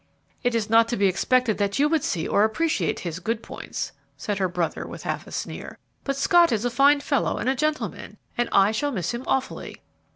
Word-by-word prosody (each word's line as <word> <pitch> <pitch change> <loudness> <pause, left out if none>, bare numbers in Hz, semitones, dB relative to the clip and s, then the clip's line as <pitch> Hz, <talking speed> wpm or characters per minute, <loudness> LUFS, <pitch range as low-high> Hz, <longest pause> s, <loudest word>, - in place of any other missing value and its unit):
"It 245 -2 0
is 220 -2 0
not 225 +1 +5
to 240 - -2
be 200 - +2
expected 225 +4 +2
that 200 -1 0
you 290 +2 +4
would 315 -1 +1
see 165 -3 -1
or 205 - +3
appreciate 310 +10 0
his 170 -1 -4
good 225 +5 -2
points," - - -6 0.3
said 205 -2 -3
her 190 - +2
brother, 175 -2 -2
with - - -9
half - - -3
a - - -11
sneer; - - -6 0.3
"but 275 - -1
Scott 345 +3 +5
is 225 0 0
a 245 - 0
fine 280 +4 +4
fellow 280 -2 0
and - - -3
a 260 - +3
gentleman, 305 +3 -3 0.2
and 240 - 0
I 195 +1 +5
shall 285 +7 -1
miss 185 - -2
him 240 +2 -4
awfully." 265 -1 -2
235 Hz, 220 wpm, -24 LUFS, 200-275 Hz, 0.3 s, not